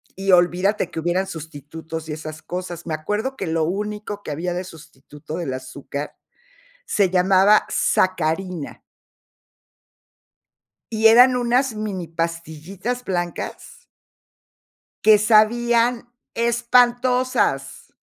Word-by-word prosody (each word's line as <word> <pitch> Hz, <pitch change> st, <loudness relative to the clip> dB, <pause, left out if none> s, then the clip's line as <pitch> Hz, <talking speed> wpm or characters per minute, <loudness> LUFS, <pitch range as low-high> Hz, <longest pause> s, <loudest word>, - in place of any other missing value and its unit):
y 195 Hz, 0 st, 0 dB
olvídate 180 Hz, +3 st, +2 dB
que 160 Hz, -, -4 dB
hubieran 175 Hz, +3 st, 0 dB
sustitutos 160 Hz, 0 st, -8 dB
y -, -, -3 dB
esas 155 Hz, 0 st, -8 dB
cosas. 175 Hz, +1 st, -6 dB
Me 165 Hz, -, -4 dB
acuerdo 210 Hz, -, -3 dB
que -, -, -5 dB
lo 160 Hz, 0 st, 0 dB
único 205 Hz, +3 st, -4 dB
que -, -, -7 dB
había 170 Hz, +4 st, -3 dB
de 180 Hz, +1 st, -3 dB
sustituto 155 Hz, -2 st, -11 dB
del 155 Hz, -7 st, -3 dB
azúcar 135 Hz, +2 st, -7 dB, 0.7 s
se 200 Hz, -3 st, +2 dB
llamaba 190 Hz, +3 st, +4 dB
sacarina. 180 Hz, -2 st, -1 dB, 2.1 s
Y 220 Hz, +1 st, +5 dB
eran 250 Hz, +3 st, +7 dB
unas 245 Hz, +1 st, +1 dB
mini 205 Hz, -5 st, -4 dB
pastillitas 170 Hz, +8 st, -4 dB
blancas 175 Hz, -5 st, -5 dB, 1.2 s
que 215 Hz, -1 st, +7 dB
sabían 235 Hz, +3 st, +3 dB, 0.3 s
espantosas. 245 Hz, +2 st, +1 dB
185 Hz, 105 wpm, -21 LUFS, 160-220 Hz, 2.1 s, eran